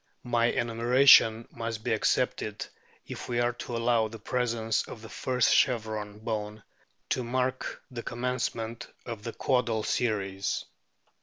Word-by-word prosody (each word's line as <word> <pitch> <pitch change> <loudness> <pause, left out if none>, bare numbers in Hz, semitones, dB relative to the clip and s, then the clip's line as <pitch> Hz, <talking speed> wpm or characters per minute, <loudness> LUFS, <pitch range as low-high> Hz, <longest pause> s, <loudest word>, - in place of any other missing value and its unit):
My 120 -1 +2
enumeration 120 -1 +5
must 115 -1 -5
be - - +1
accepted - - 0 0.4
if - - -7
we 120 -1 0
are 120 0 +2
to 120 0 -5
allow 115 -1 +2
the 115 +1 -9
presence 115 -1 0
of 110 - -9
the 110 - -9
first 125 -2 +1
chevron 110 -4 +1
bone 105 -1 -4 0.5
to 125 - 0
mark 130 +2 -2
the 120 -2 -5
com 120 +1 -7
mencement 125 -2 -2 0.2
of 115 -3 -6
the 115 +1 -6
caudal 120 -4 +1
series. 100 -5 -1
115 Hz, 140 wpm, -28 LUFS, 110-125 Hz, 0.5 s, enumeration